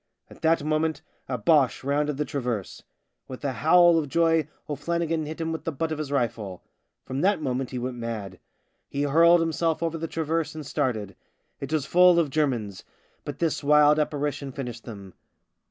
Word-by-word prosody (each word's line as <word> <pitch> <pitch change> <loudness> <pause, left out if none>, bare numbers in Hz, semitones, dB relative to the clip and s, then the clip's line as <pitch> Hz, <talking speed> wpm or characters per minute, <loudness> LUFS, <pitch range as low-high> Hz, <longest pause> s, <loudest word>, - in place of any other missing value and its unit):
At - - -15
that 165 -1 +2
moment 155 0 -1 0.3
a 125 - -1
Boche 135 +4 +2
rounded 145 +1 0
the 150 - -1
traverse. 120 -9 -4 0.5
With 130 +2 -8
a 140 - 0
howl 170 +3 +5
of 150 -3 -4
joy 165 0 +2 0.2
O'Flannigan 165 +1 -2
hit 155 +2 -7
him 165 0 -2
with 160 - -4
the 165 - -2
butt 160 +3 -3
of 155 - -3
his 150 -2 -4
rifle. 110 -8 -2 0.4
From 130 +2 -4
that 200 +1 +2
moment 130 -3 -2
he 130 - -5
went 125 0 -4
mad. 110 -6 -5 0.5
He 140 - -2
hurled 165 +4 +5
him 165 - 0
THE - - -4
SIXTH - - -6
DRUNK 165 -1 +3
85 - - -16
self - - -6
over 165 0 -1
the 165 - -3
traverse 160 0 -2
and 155 -2 -7
started. 110 -7 -2 0.4
It 140 - -6
was 155 -4 0
full 180 +1 +5
of 160 -5 +2
Germans 120 -10 -1 0.2
— - - -39
but - - -5
this 165 -3 -1
wild 150 +1 +5
apparition 145 -2 -2
finished 120 -3 -7
them. 100 -5 -10
150 Hz, 200 wpm, -26 LUFS, 130-160 Hz, 0.5 s, howl